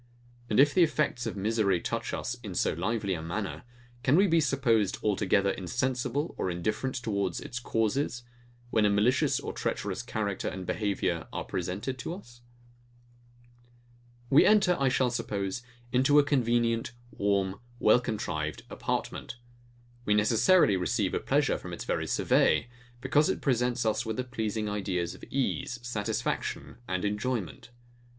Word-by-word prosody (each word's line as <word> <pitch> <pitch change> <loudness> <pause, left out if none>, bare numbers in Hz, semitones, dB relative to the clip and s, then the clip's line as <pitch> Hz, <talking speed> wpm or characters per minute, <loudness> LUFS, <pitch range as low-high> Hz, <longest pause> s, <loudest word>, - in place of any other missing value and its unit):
And 105 - +2
if 145 +1 +6
the 185 - +4
effects 150 -7 +1
of 110 - -4
misery 100 -2 +1
touch - - -3
us 120 - -3
in 100 -6 -7
so - - +1
lively 100 +3 -1
a 80 - -3
manner; 95 +5 -4 0.4
can 135 +4 +3
we 195 +4 +6
be 165 -3 +3
supposed 125 -8 +2
altogether 100 -1 +2
insensible 125 - -2
or - - 0
indifferent 105 +9 -2
towards 100 -6 -1
its 125 - -6
causes; 120 +2 -1 0.5
when 110 - +3
a 105 - +4
malicious 105 +6 +2
or - - -5
treacherous - - -2
character 100 -3 -3
and 95 -1 -4
behaviour 95 -5 -1
are - - -3
presented 95 +9 -4
to 165 - -4
us? 120 -11 -14 1.9
We 140 - +7
enter, 200 -4 +5
I 135 -1 +3
shall 125 -1 +2
suppose, 110 -3 -2 0.3
into 135 +4 +4
a 145 - +7
convenient, 120 -4 +1 0.2
warm, 100 -1 0 0.2
well 115 +1 +5
contrived 80 -10 -3
apartment: - - -3 0.7
We 105 -3 +2
necessarily 110 - +4
receive 95 +2 0
a - - +1
pleasure - - +1
from - - -8
its - - -5
very - - -1
survey; 120 - +2 0.3
because 145 +3 +3
it - - -1
presents 125 -2 +1
us 110 +2 +1
with 110 -1 -4
the 130 - 0
pleasing 110 -3 -3
ideas 95 -4 -2
of - - -15
ease, 130 -2 -2
satisfaction, 110 -2 -3
and 95 +1 -1
enjoyment. 105 -1 -3
110 Hz, 150 wpm, -29 LUFS, 100-125 Hz, 1.9 s, We